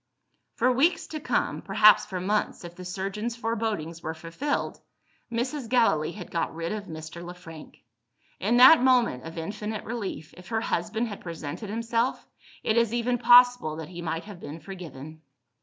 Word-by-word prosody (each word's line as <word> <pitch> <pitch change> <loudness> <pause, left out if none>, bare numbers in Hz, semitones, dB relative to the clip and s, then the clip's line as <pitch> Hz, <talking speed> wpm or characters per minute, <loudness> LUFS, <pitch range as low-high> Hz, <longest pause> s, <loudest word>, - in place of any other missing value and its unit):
For 255 +2 +3
weeks 290 +8 +2
to 310 - -6
come 305 - -1
perhaps 215 0 +5
for 190 -3 -4
months 205 +2 -1
if 170 - -9
the 180 - -9
surgeons' 195 +5 -4
forebodings 215 -8 -3
were 160 0 -4
fulfilled 170 - -3 0.5
Mrs. 245 +2 -2
Gallilee 175 -11 +2
had 180 -5 -9
got 165 -1 -2
rid 165 0 -3
of 210 -1 -4
Mr. 160 0 -8
Le 175 +1 -8
Frank. 165 -3 -13 0.6
In 225 +5 +2
that 260 +4 +9
moment 245 - +3
of 165 +1 -8
infinite 210 +5 -4
relief, 210 -9 -5
if 180 -1 -13
her 225 +1 -1
husband 220 +5 -1
had 205 -3 -7
presented 170 +4 -6
himself, 230 +3 -1 0.4
it 220 - +1
is 235 0 +2
even 245 +1 0
possible 245 -8 +6
that 160 0 -7
he 175 -1 -8
might 165 0 -3
have 205 -4 -10
been 160 -1 -8
forgiven. 155 -4 -9
205 Hz, 170 wpm, -27 LUFS, 165-235 Hz, 0.6 s, that